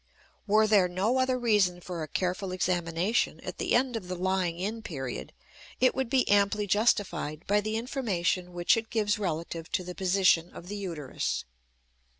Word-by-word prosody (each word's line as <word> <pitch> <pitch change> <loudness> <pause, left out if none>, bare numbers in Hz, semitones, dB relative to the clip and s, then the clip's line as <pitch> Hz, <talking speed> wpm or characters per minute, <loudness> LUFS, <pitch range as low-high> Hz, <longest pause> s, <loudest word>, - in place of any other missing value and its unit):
Were 215 +2 +5
there 205 -4 +4
no 195 +8 0
other 260 0 +2
reason 210 -7 +2
for 175 -1 -6
a 155 - -4
careful 185 +3 -2
examination 180 +3 0
at - - -7
the - - +1
end 250 0 +2
of 205 -5 -5
the 180 - -3
lying 185 -1 0
in 210 +5 -3
period, 130 - -5 0.5
it 255 0 +4
would 265 -3 -2
be 260 0 +2
amply 205 +1 +3
justified 200 -6 0
by 205 +1 +2
the 215 +1 -3
information 195 -8 -1
which 175 0 +3
it 225 -1 -4
gives 210 -1 0
relative 165 -3 -4
to 185 - 0
the 180 0 -6
position 185 -2 +3
of 175 - -10
the 205 - -4
uterus. 160 - -3
190 Hz, 170 wpm, -28 LUFS, 175-215 Hz, 0.5 s, Were